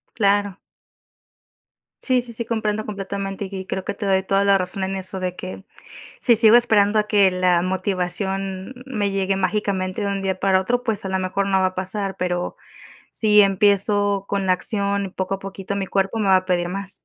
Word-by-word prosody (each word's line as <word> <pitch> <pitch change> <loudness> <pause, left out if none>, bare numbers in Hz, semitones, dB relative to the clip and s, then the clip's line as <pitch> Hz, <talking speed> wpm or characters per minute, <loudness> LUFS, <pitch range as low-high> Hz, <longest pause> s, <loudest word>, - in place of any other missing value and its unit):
Claro. 205 -2 +1 1.4
Sí, 255 -2 +2
sí, 235 -1 -10
sí, 235 - -4
comprendo 215 -2 -2
completamente 195 -1 -4
y 195 -1 -6
y - - -10
creo 190 0 -4
que - - -2
te 205 +1 -6
doy 190 -1 +2
toda 195 +1 +1
la 200 -1 +4
razón 185 +1 -3
en 190 0 -2
eso 190 0 -6
de 180 -1 -3
que 185 +1 -7 0.6
si 235 -3 +5
sigo 220 0 +6
esperando 215 -3 +4
a 210 - -5
que 200 -3 +4
la 180 -1 +2
motivación 190 +2 -2
me 210 -6 -1
llegue 195 0 0
mágicamente 190 0 -1
de 200 - -1
un 200 -1 -2
día 190 -1 -1
para 190 -1 +3
otro, 245 +5 -1
pues, 220 -4 -2
a 190 - -3
lo 190 - -1
mejor 190 +1 -1
no 190 -1 +3
va 190 - +3
a 185 - -3
pasar, 190 +1 -3
pero 180 -1 -2 0.6
si 210 -1 +4
empiezo 200 0 +2
con 200 -1 -1
la 185 - +4
acción 200 +1 0
y - - -6
poco 190 +1 -3
a - - -4
poquito 195 0 -6
mi 195 -1 -3
cuerpo 195 +3 0
me 200 - +1
va 190 - +6
a 185 - 0
pedir 175 -1 0
más. 195 +1 -5
195 Hz, 210 wpm, -22 LUFS, 190-205 Hz, 1.4 s, sigo